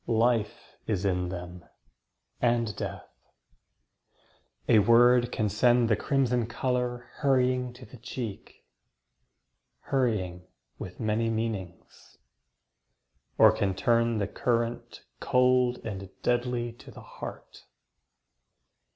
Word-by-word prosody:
Life 115 -1 0
is 100 -2 -1
in 90 -2 0
them, 90 -1 -7 0.8
and 115 -3 +1
death. - - -6 1.6
A 110 - +6
word 120 +3 +5
can 110 - 0
send 120 +3 +3
The - - +5
crimson 125 -1 0
colour 125 0 -2
hurrying 130 -3 +1
to 125 +1 -13
the 130 - -14
cheek. 120 - -7 1.2
Hurrying 95 -9 -1 0.3
with 90 -1 -8
many 115 +1 0
meanings; 110 -6 -5 1.2
or - - +8
can 95 -2 -1
turn 115 +3 +2
The 100 - 0
current 115 +2 -2 0.2
cold 125 -1 +3
and 95 -2 -6
deadly 120 -1 0
to - - -13
the - - -12
heart. - - -10
115 Hz, 100 wpm, -28 LUFS, 105-125 Hz, 1.6 s, or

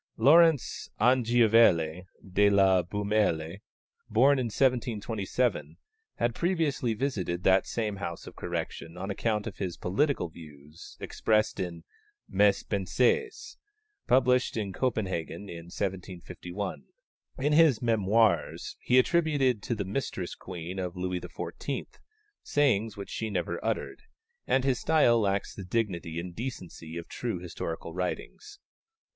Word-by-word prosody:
Laurence 160 -1 +4
Anglivielle 115 -8 +4 0.3
de 100 +1 +5
la 95 -2 +4
Beaumelle, 100 -3 0 0.5
born 135 +5 +4
in 125 - 0
1727, 120 -1 0 0.4
had 120 0 0
previously 155 -8 0
visited 100 -9 -2
that 95 0 +4
same 105 -3 -2
house 85 -3 -5
of - - -11
correction 85 +2 -5
on 95 +3 -4
account 105 +1 -1
of - - -6
his 90 -4 -3
political 120 - 0
views 75 -2 -13
expressed 110 -1 0
in 85 -2 -4 0.4
Mes - - +3
Pensées, 450 -2 0 0.5
published 125 -1 +3
at 100 -3 -3
Copenhagen 100 -7 -2
in 85 -1 -8
1751. 95 +1 -5 0.5
In 145 +3 +1
his 155 -5 +6
Mémoires 110 -2 +1
he 125 - +2
attributed 135 -5 +2
to 120 - -2
the 100 -2 -3
mistress 95 -4 -3
queen 90 +2 -7
of 90 -1 -4
Louis 90 0 -2
XIV. - - -5 0.6
sayings 115 -8 +1
which 100 - -7
she 110 - -3
never 85 -3 -3
uttered, 115 - -2 0.5
and 130 - +2
his 130 -2 +1
style 150 -7 +4
lacks 100 -2 0
the 100 - -8
dignity 90 -5 -2
and 85 0 -7
decency 90 -9 -6
of 85 - -7
true 115 -6 -3
historical 85 -1 -6
writings. 95 - -5
105 Hz, 125 wpm, -28 LUFS, 90-125 Hz, 0.6 s, his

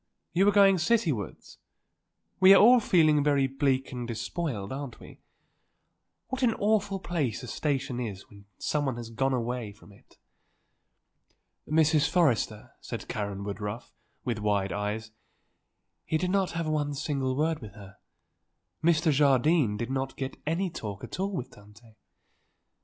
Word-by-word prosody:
"You 190 +4 +3
are - - +6
going 195 -1 +6
citywards? 165 - -1 0.8
We 190 +1 +8
are - - +7
all 245 +4 +7
feeling 155 -8 +3
very 140 -2 +3
bleak 135 -1 0
and 125 -2 -5
despoiled, 120 - -4
aren't 135 -3 -6
we? - - -14 1.1
What 260 +1 -4
an 235 -3 +3
awful 205 -2 +1
place 150 - -2
a - - -7
station 135 -1 -2
is 105 -6 -5
when 100 -1 -16
someone 145 -4 -1
has 115 -1 -7
gone 135 +4 0
away 120 -2 -3
from 105 - -18
it." 100 - -22 1.5
"Mrs. 155 -1 +3
Forrester," 125 -11 +1
said - - -7
Karen 100 -2 -4
Woodruff, 105 +3 -6 0.3
with 120 -4 -2
wide 100 -2 0
eyes, 105 +2 -3 0.9
"he 160 - 0
did 180 +3 -1
not 195 -2 +1
have 165 0 -2
one 145 -2 -1
single 135 -2 -2
word 160 +1 +1
with 105 -5 -10
her; 95 -2 -13 0.9
Mr. 165 -1 +3
Jardine 140 -3 +3
did 120 +3 -4
not 135 0 -3
get 135 -1 -4
any 175 +3 0
talk 105 -7 -7
at - - -7
all 195 +1 -1
with 135 -10 -5
Tante. 105 +2 -18
135 Hz, 145 wpm, -28 LUFS, 110-165 Hz, 1.5 s, We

